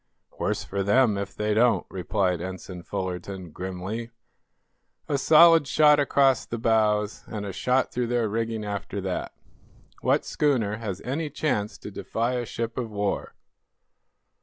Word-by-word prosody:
"Worse - - -1
for 100 0 -3
them, 110 +2 +3
if 100 0 -4
they 105 0 0
don't," 110 -3 +3
replied 90 -1 -1
Ensign 95 0 -7
Fullerton, 90 0 -5
grimly. 95 +7 -5 1.0
"A 140 - 0
solid 165 0 +7
shot 150 +3 +5
across 140 -3 +3
the 115 - -5
bows, 110 -2 +1
and 105 -2 -5
a 100 - -5
shot 125 +7 +1
through 125 -1 -1
their 120 -1 +1
rigging 110 0 -2
after 100 -1 -4
that. 95 -1 -3 0.7
What - - +2
schooner 120 -8 +1
has 100 -4 -5
any 150 +5 -3
chance 110 - -1
to - - -9
defy 115 +3 -2
a 120 -2 -2
ship 115 +1 -4
of 120 -3 -3
war?" 100 -1 -2
110 Hz, 145 wpm, -26 LUFS, 100-125 Hz, 1.0 s, solid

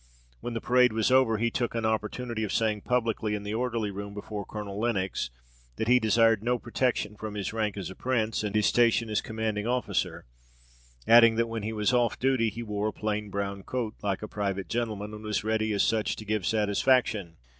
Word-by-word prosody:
When 115 - -4
parade 125 0 +4
was 110 +2 +1
over, 130 -4 +4
he 115 +2 0
took 120 0 -2
an 115 -1 -1
opportunity 110 +1 -2
of 105 - -2
saying 110 -2 +1
publicly 115 -3 0
in 105 - -5
the 105 +1 -4
orderly 115 -3 -1
room 100 +1 -7
before 105 0 -6
Colonel 105 -2 -6
Lenox, 95 - -1 0.5
that 110 - -2
he 125 +1 +6
desired 115 -1 +3
no 125 +1 +1
protection 120 -2 -1
from 105 0 -6
his 100 0 -3
rank 105 -3 -1
as 95 -1 -5
a - - -10
prince 115 -4 -1
and 105 -1 -3
his 105 -1 +3
station 115 +1 +3
as 105 - +1
commanding 110 -2 -3
officer; 125 +1 -1 0.8
adding 115 -1 +7
that, 115 +1 +2
when 115 -1 -4
he 110 +2 -3
was 105 +2 0
off 120 -2 +2
duty 130 -3 +2
he 115 +3 -6
wore 105 -1 -2
a - - -1
plain 105 -1 -3
brown 100 0 -3
coat 115 +1 -3
like 100 0 -2
a - - -4
private 100 -2 -3
gentleman, 110 -3 -3
and 105 0 -8
was 105 -1 -1
ready 110 0 0
as 100 - +2
such 110 -2 +1
to 110 - -9
give 105 -3 -1
satisfaction. 105 -3 +2
110 Hz, 205 wpm, -28 LUFS, 105-115 Hz, 0.8 s, adding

